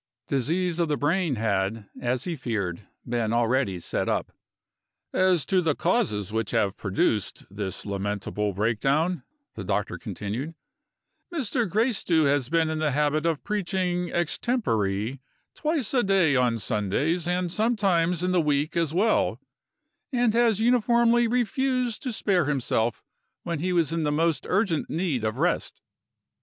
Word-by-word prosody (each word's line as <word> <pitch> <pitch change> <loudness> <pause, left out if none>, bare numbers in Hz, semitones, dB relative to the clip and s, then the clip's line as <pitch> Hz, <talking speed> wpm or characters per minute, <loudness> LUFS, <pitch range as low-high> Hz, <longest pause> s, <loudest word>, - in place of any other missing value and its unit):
Disease 170 +6 0
of 170 - +2
the 150 - +1
brain 160 0 +1
had, 105 -1 -1
as 125 +1 -1
he 175 - -3
feared, 105 - -3 0.2
been 115 -2 0
already 120 -4 +1
set - - -2
up. - - -1 0.8
"As 185 -4 +3
to 185 -1 +2
the 160 -4 +1
causes 140 - 0
which 110 -2 -1
have 105 -4 +1
produced 100 +1 -1
this 100 -3 -4
lamentable 105 +1 -2
break 105 +3 0
down," 160 +6 +1 0.3
the 105 - -6
doctor - - -2
continued, 120 +11 -5 0.8
"Mr. 250 - -1
Gracedieu 200 -6 +2
has 140 -3 +1
been 165 0 +2
in 160 0 -2
the 155 -1 +1
habit 150 +2 +1
of 160 -3 -1
preaching 180 -3 -1
extempore 130 - -1 0.3
twice 300 -7 -1
a 255 - +4
day 190 -8 +3
on 125 -2 +2
Sundays, 120 - -1
and 180 -1 0
sometimes 185 -6 +1
in 180 - +1
the 180 -1 +3
week 150 +1 0
as 165 -2 0
well 215 +5 +2 0.7
and 245 -4 +2
has 230 -3 +3
uniformly 235 0 +3
refused 250 0 0
to 255 - -3
spare 190 -6 +1
himself 120 -5 0 0.4
when 170 -3 -3
he 180 +4 -1
was 165 -3 +1
in 165 - 0
most 155 +2 0
urgent 185 -5 +1
need 160 - -1
of 110 -1 -1
rest. - - 0
160 Hz, 145 wpm, -26 LUFS, 115-190 Hz, 0.8 s, a